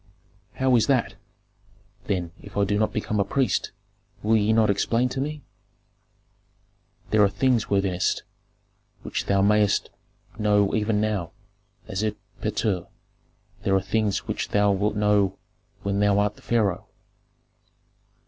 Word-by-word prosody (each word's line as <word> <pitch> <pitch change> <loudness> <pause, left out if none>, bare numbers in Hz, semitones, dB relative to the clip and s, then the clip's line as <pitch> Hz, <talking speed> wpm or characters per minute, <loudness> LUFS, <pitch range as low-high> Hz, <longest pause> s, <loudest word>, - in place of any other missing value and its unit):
"How 130 -1 +3
is 115 - +3
that? 130 -4 +1 0.9
Then, 90 -4 -2
if 100 0 -11
I 100 - +3
do 105 +1 0
not 110 0 +1
become 105 0 -2
a - - +4
priest, 135 +5 0 0.5
will 110 +2 +3
ye 110 0 +3
not 110 -2 +4
explain 115 +5 +1
to 135 - -3
me?" 150 0 -4 1.7
"There 110 -1 +5
are 100 - +4
things, 115 +3 +1
worthiness, 95 -2 0 0.8
which - - -3
thou 100 0 +3
mayest 105 0 +2 0.5
know 105 -2 +2
even 105 -1 +1
now, 105 -6 -2 0.5
as 95 - -3
erpatr, 105 -2 -3 0.7
there 95 - +1
are - - +5
others 100 +1 -1
which - - -3
thou 105 0 +3
wilt 105 +2 0
know 105 -2 +2 0.5
when 100 0 -1
thou 100 -1 +3
art 105 0 +1
the - - -19
pharaoh. 110 -6 0
105 Hz, 135 wpm, -25 LUFS, 100-110 Hz, 1.7 s, There